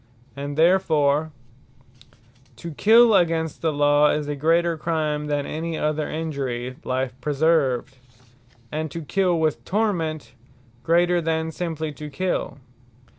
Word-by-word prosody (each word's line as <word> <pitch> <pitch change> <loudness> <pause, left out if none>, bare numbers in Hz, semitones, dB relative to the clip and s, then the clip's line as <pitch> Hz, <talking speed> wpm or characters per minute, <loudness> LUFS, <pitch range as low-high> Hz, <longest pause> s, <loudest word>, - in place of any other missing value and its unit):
And 140 +1 -5
therefore 160 -3 +3 1.2
To 170 - -8
kill 225 +8 +5
against 165 -4 +1
the 160 - +1
Law, 145 0 +3
is 150 -1 -1
a 145 - -2
greater 165 +3 +2
Crime, 155 -2 -2
that 145 -1 -1
any 160 +1 -4
other 155 0 -1
injury, 135 -6 -4
life 130 0 -2
preserved. 140 -3 +1 0.8
And 155 +1 -3
to 165 +2 -6
kill 180 +2 +1
with 155 -2 0
Torment, 175 -7 -2 0.5
greater, 175 +4 +2
than 160 0 -1
simply 160 -2 -4
to 150 +2 -8
kill. 175 -4 -2
155 Hz, 125 wpm, -23 LUFS, 145-170 Hz, 1.2 s, kill